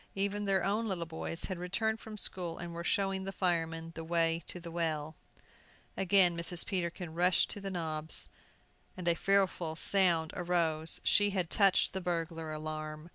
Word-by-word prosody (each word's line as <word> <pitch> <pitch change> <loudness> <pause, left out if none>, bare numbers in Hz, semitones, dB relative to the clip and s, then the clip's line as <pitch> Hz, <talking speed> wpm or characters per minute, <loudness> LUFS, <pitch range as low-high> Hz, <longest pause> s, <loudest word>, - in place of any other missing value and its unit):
Even 200 +1 -1
their 195 -2 +2
own 210 +4 0
little 180 -4 -2
boys 165 +1 -2
had 185 -3 -4
returned 220 +5 -1
from 220 -1 -9
school, 180 -4 -2
and 170 -1 -6
were 170 0 -5
showing 195 +1 0
the 195 - -4
firemen 165 -3 -1
the 165 - -6
way 165 0 +1
to 180 - -6
the 170 -1 -9
well. 160 -2 -2 0.8
Again 190 -2 +4
Mrs. 170 +1 +2
Peterkin 175 -3 -3
rushed 175 +1 +3
to 205 - -7
the 195 - -4
knobs, 160 -4 -2 0.7
and 180 -2 -5
a 170 - +5
fearful 185 -3 +1
sound 170 -3 +3
arose. 165 -3 +1
She 205 0 +4
had 185 -4 -2
touched 195 -3 +3
the 190 - -3
burglar 165 -2 -3
alarm! 155 +1 -6
175 Hz, 170 wpm, -32 LUFS, 165-195 Hz, 0.8 s, a